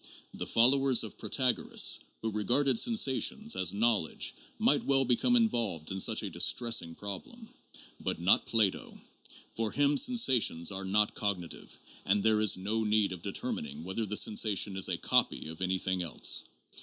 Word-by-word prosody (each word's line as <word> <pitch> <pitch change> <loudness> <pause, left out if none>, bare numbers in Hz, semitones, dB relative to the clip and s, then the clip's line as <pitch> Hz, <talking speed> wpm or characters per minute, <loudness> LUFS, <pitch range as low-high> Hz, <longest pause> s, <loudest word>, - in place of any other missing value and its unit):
The - - -6
followers 130 +2 +4
of 110 - -9
Protagoras 125 - 0 0.2
who 110 - -3
regarded 120 +5 +1
sensations 220 - +1
as 90 -2 +2
knowledge 105 -5 -1 0.2
might - - +2
well 135 -1 +1
be 125 0 +3
come 245 - 0
involved 115 - -1
in 95 - -4
such - - +1
a - - -5
distressing 115 -9 +2
problem. 105 - -9 0.5
But - - -4
not 90 +3 +2
Plato. 110 -5 -1 0.6
For 110 -2 -2
him 145 0 +1
sensations 130 - +2
are 95 0 -6
not 105 +2 +1
cognitive, 95 -5 -5 0.3
and 100 +1 0
there 110 -1 +1
is 105 -3 +4
no 105 +4 -3
need 105 -2 0
of 90 -2 -8
determining 75 -1 -4
whether 95 +5 -4
the 105 - +2
sensation 105 -2 +1
is 95 - +1
a - - -2
"copy" - - 0
of 80 +2 -10
anything 95 0 -2
else. 85 -3 +1
105 Hz, 155 wpm, -29 LUFS, 95-125 Hz, 0.6 s, followers